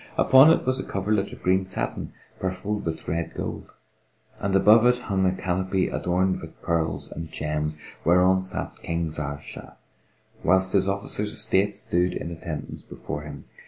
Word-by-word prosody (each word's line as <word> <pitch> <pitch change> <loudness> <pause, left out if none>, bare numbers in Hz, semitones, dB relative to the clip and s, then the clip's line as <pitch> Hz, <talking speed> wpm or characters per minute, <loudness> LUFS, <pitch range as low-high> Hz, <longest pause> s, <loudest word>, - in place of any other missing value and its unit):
Upon 130 +4 +7
it 165 - +3
was 130 +1 +1
a - - -2
coverlet 100 +1 -1
of - - -12
green 95 +1 +3
satin 95 0 -2 0.3
purfled 95 +3 -3
with 80 -1 -4
red 85 0 -2
gold, - - -5 0.7
and 100 0 -1
above 110 +4 +6
it 125 0 +4
hung 95 -6 0
a - - +3
canopy 95 +1 -1
adorned 95 +1 0
with - - -11
pearls 85 -1 0
and 80 -1 -7
gems, 75 0 -2 0.3
whereon 90 +2 +4
sat 95 - -2
King 85 -1 -2
Zahr 70 -2 -4
Shah, - - -11 0.7
whilst 95 +1 +4
his 95 -1 +3
officers 100 +1 -2
of - - -9
state 100 +2 +1
stood 90 -3 +1
in 85 - -5
attendance 80 -2 -6
before 75 - -7
him. 75 -1 -9
95 Hz, 165 wpm, -25 LUFS, 85-100 Hz, 0.7 s, Upon